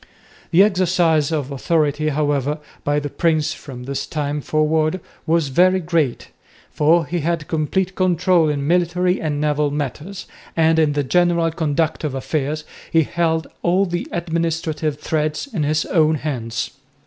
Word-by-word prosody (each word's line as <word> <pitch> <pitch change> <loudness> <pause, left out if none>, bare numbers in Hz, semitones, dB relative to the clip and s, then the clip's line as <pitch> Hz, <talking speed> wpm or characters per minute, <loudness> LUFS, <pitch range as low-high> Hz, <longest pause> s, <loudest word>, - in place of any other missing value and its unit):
The 180 +3 +6
exercise 175 -6 +2
of 145 -4 -2
authority, 155 +1 +1
however, 145 -1 0 0.3
by 145 0 +1
the 145 - -4
prince 155 0 +1
from 130 -5 -9
this 135 +1 -4
time 150 -1 -2
forward 155 +3 +1 0.3
was 160 -3 +2
very 185 +7 +4
great, 160 -7 -1 0.4
for 165 +2 +3
he 175 +3 -2
had 165 0 -1
complete 175 +4 -1
control 180 -3 +2
in 140 -1 -1
military 180 +2 +1
and 150 -2 -1
naval 150 0 +1
matters, 150 +6 -5 0.3
and 160 0 +4
in 155 -2 +3
the 145 0 0
general 170 +2 +2
conduct 160 0 -1
of 145 -3 -2
affairs 150 +2 -2 0.3
he 165 -1 +4
held 160 0 0 0.2
all 185 +3 +2
the 175 -1 -3
administrative 165 -3 -2
threads 155 - -1
in 175 - -1
his 150 +1 +1
own 160 -2 +3
hands. 125 -6 -3
155 Hz, 150 wpm, -20 LUFS, 150-170 Hz, 0.4 s, The